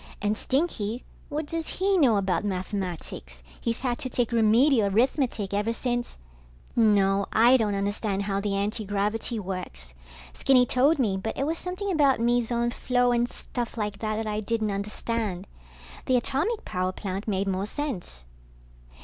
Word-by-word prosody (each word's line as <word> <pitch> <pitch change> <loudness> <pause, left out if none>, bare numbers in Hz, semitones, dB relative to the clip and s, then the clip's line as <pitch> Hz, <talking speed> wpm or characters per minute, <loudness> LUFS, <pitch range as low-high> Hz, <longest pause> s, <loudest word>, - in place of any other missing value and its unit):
And 205 +1 0
Stinky, 250 -5 -1 0.3
what 300 +1 -2
does 325 +1 -4
he 390 +1 +2
know 260 - +4
about 190 -2 0
mathematics? 180 - -4 0.2
He's 230 0 -1
had 245 -2 -1
to 255 - -3
take 245 -1 0
Remedial 230 +1 +4
Arithmetic 225 -1 +1
ever 205 +3 +1
since... 240 0 -2 0.6
No, 200 -3 +3
I 235 +4 +6
don't 215 -5 +1
understand 200 0 -1
how 200 0 -1
the 200 -1 -1
antigravity 210 +2 -1
works. 180 - -6 0.4
Skinny 255 -2 +4
told 275 +6 +3
me, 210 -8 +1
but 220 +4 -4
it 275 - 0
was 325 +2 -1
something 370 +2 -3
about 285 -7 +3
meson 235 0 +1
flow 245 0 +1
and 240 0 +1
stuff 240 -2 -5
like 210 -2 -3
that 215 -1 -1
that 220 +1 -2
I 210 0 -1
didn't 215 0 -1
understand. 200 -1 -3 0.6
The 255 - +4
atomic 295 - -1
power 185 0 -1
plant 195 +2 -5
made 195 -1 0
more 195 +1 -1
sense. 215 - -5
220 Hz, 155 wpm, -26 LUFS, 200-250 Hz, 0.6 s, I